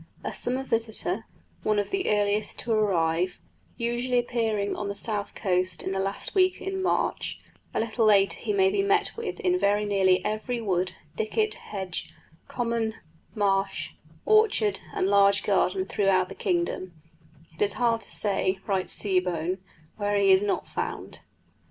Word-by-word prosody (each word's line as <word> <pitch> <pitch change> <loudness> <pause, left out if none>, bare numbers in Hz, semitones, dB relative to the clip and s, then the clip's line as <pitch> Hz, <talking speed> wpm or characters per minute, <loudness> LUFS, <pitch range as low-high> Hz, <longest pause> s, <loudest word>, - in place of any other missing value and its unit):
A - - -4
summer 255 +2 +1
visitor, 225 -4 -1 0.4
one 215 -1 +1
of 205 - -1
the 390 -1 0
earliest 205 0 +1
to 235 - -4
arrive, 180 -4 +1 0.4
usually 240 +2 0
appearing 225 -4 0
on 205 - -4
the 200 - -3
South 205 -1 -2
Coast 185 -3 0
in 190 - -3
the 195 - -1
last 195 +1 -2
week 370 -2 +3
in 385 0 -3
March; 375 - -1 0.3
a - - -1
little 225 0 +1
later 195 -4 +4
he - - -2
may 385 -1 +3
be 400 0 +1
met 405 +1 +2
with 465 - -5
in 365 -2 +2
very 205 - +2
nearly 190 -2 +2
every 220 +3 -2
wood, 185 -4 -1 0.2
thicket, 430 - 0
hedge, 190 -4 -6 0.4
common, 230 -2 -1 0.4
marsh, 195 -2 0 0.3
orchard, 420 - +3 0.2
and 185 - +1
large 200 0 +4
garden 190 -1 +1
throughout 190 -2 +2
the - - -7
kingdom 345 - -2 0.6
it - - -13
is 205 -1 +4
hard 235 -2 +1
to - - -9
say, 195 -2 +1
writes 190 -2 0
Seebohm, 180 -2 0 0.4
where 205 -1 0
he 200 -1 +4
is 190 0 +6
not 205 -1 -1
found. - - -5
205 Hz, 160 wpm, -26 LUFS, 190-240 Hz, 0.6 s, is